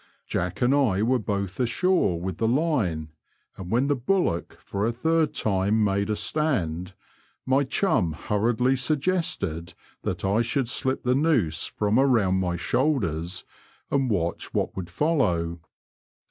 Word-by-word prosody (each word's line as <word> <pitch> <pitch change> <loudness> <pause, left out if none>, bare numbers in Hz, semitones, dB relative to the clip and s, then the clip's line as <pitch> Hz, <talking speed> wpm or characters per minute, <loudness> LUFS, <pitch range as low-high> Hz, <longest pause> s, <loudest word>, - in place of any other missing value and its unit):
Jack 90 +7 -2
and 125 +3 +4
I 110 -9 +2
were 125 +2 +2
both 100 -2 -3
ashore 125 - +2
with 90 0 -4
the 115 - +2
line, 115 - 0 0.4
and 90 -2 -8
when 120 +6 +2
the 145 0 +2
bullock 130 - -1
for 100 0 -4
a 115 - +2
third 160 +5 +1
time 100 +1 +1
made 100 0 +1
a 105 - +1
stand, 95 - -1 0.5
my 135 +2 +3
chum 110 - +1
hurriedly 120 +9 +1
suggested 135 - -1 0.3
that - - -3
I 100 +4 +2
should 125 +2 0
slip 130 +1 -1
the 125 - +2
noose 130 - +1
from 105 +3 +1
around 110 -9 +3
my 90 -2 -1
shoulders 90 - -1 0.5
and 135 -2 +1
watch 85 -6 -2
what - - -1
would 90 -3 -5
follow. 90 - 0
110 Hz, 145 wpm, -25 LUFS, 90-135 Hz, 0.5 s, and